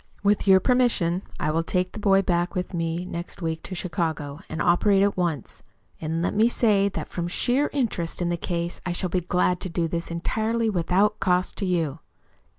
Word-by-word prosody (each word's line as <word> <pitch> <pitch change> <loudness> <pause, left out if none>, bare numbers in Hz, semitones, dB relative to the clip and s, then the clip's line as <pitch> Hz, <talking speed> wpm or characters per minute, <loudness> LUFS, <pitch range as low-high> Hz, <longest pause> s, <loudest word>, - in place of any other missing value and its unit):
With 205 0 +2
your 190 -1 +7
permission 225 -8 +2 0.2
I 155 - 0
will 165 +2 +1
take 180 +2 -1
the - - -8
boy 195 -1 +4
back 175 +1 0
with 180 0 -3
me 165 +1 -2
next 170 +1 -6
week 160 -2 -3
to 185 - -7
Chicago, 160 -5 -2
and 160 - -5
operate 195 +5 +4
at 200 0 +2
once. 170 -8 -2 0.4
And 165 +1 -2
let - - 0
me 220 +2 +4
say 205 -5 +3
that - - -5
from 175 -1 -3
sheer 250 +10 +1
interest 215 - -1
in 175 -1 0
the 175 - +1
case 170 0 -3
I 180 - -2
shall 180 +1 -2
be 185 - +1
glad 180 +1 +1
to 185 - -3
do 165 -1 -1
this 170 +1 -3
entirely 220 +6 0
without 190 +3 +1
cost 180 -1 +1
to 195 - -1
you." 165 -5 0
180 Hz, 200 wpm, -25 LUFS, 170-200 Hz, 0.4 s, your